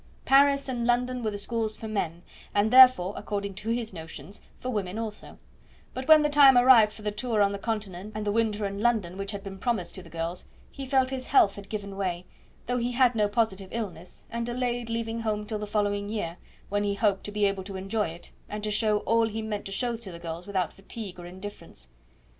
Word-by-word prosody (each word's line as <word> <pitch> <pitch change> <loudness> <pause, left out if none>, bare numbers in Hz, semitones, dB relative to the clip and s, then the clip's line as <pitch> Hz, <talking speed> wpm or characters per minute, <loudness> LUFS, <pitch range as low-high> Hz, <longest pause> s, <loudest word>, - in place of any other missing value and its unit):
Paris 275 +1 +5
and 240 -2 -2
London 250 +1 +1
were 220 - 0
the 205 - -4
schools 220 +1 -2
for 220 - -7
men, 175 -5 -3 0.3
and 205 +2 +3
therefore, 255 -8 +8
according 200 -1 -4
to 210 +4 -6
his 230 -2 -2
notions, 165 +4 -9 0.2
for 255 - -3
women 200 -3 -3
also; 220 -2 -6 0.6
but 260 0 -5
when 310 -1 +8
the - - +3
time 280 -3 +7
arrived 245 -4 +7
for 215 - -13
the 210 - -1
tour 225 +1 -1
on 200 -1 +4
the 200 - -4
Continent 210 -3 -4
and 215 0 -3
the 205 - +1
winter 215 -1 0
in 200 +1 -4
London, 215 -7 +1
which 195 +1 -4
had 200 -2 -6
been 195 -1 -8
promised 215 -6 -1
to 190 - -8
the 170 - -14
girls, 165 +2 -4 0.3
he 275 -1 -7
felt 260 -1 +2
his 255 -1 -3
health 200 - +5
had 200 -1 -11
given 200 -2 -5
way, 180 -2 -2 0.4
though 250 +1 0
he 240 +1 -1
had 250 -1 +4
no 210 -2 +2
positive 205 -3 -1
illness, 185 -7 -6
and 235 0 -3
delayed 240 -1 -2
leaving 230 0 -2
home 215 -2 -2
till 215 0 -4
the 210 - -5
following 205 -1 0
year, 180 -6 -3 0.3
when 205 +1 0
he 200 -1 0
hoped 200 -2 +1
to 210 - -5
be 205 0 +1
able 195 -1 0
to 195 0 -7
enjoy 200 +2 -1
it, 165 +1 -10 0.2
and 210 0 -5
to 215 - -1
show 210 0 +2
all 230 0 +2
he 220 0 -4
meant 210 -2 -4
to 195 - -5
show 240 +4 -1
to 225 -4 -8
the 170 - -8
girls 170 +2 -7
without 190 -4 -1
fatigue 195 -1 -8
or 175 - -8
indifference. 185 - -10
210 Hz, 230 wpm, -27 LUFS, 195-235 Hz, 0.6 s, therefore